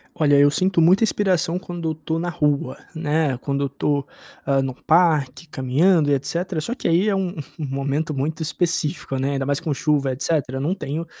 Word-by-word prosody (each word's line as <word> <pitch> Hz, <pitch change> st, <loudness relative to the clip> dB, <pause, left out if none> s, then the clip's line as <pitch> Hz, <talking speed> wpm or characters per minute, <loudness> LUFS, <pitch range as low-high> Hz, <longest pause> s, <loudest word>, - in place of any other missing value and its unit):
Olha, 145 Hz, -2 st, +3 dB
eu 145 Hz, 0 st, +6 dB
sinto 185 Hz, +3 st, +1 dB
muita 180 Hz, +6 st, +5 dB
inspiração 185 Hz, -5 st, +1 dB
quando 175 Hz, -2 st, -5 dB
eu -, -, -1 dB
estou 160 Hz, +1 st, -3 dB
na 175 Hz, +1 st, -2 dB
rua, 155 Hz, -2 st, 0 dB, 0.2 s
né, 155 Hz, -3 st, 0 dB
quando 140 Hz, +1 st, -2 dB
eu -, -, +1 dB
estou, 140 Hz, 0 st, -1 dB, 0.4 s
ah, 135 Hz, -1 st, +2 dB
num 135 Hz, -1 st, -2 dB
parque, 155 Hz, -1 st, +2 dB
caminhando 150 Hz, +4 st, +2 dB
e -, -, +4 dB
etcétera. 160 Hz, +5 st, -2 dB
Só 230 Hz, +10 st, -3 dB
que -, -, -3 dB
aí 175 Hz, +5 st, +3 dB
é 200 Hz, -, +1 dB
um 190 Hz, -2 st, -1 dB, 0.3 s
um 155 Hz, -, -2 dB
momento 140 Hz, +3 st, -2 dB
muito 155 Hz, +4 st, -2 dB
específico, 155 Hz, -4 st, -1 dB
né, 135 Hz, +2 st, 0 dB
ainda 135 Hz, -1 st, -1 dB
mais 140 Hz, 0 st, +1 dB
com 160 Hz, -3 st, -2 dB
chuva 140 Hz, -1 st, +1 dB
e -, -, -2 dB
etcétera, 135 Hz, -1 st, -1 dB
não 155 Hz, +8 st, 0 dB
tenho 160 Hz, -2 st, -4 dB
155 Hz, 205 wpm, -22 LUFS, 140-170 Hz, 0.4 s, eu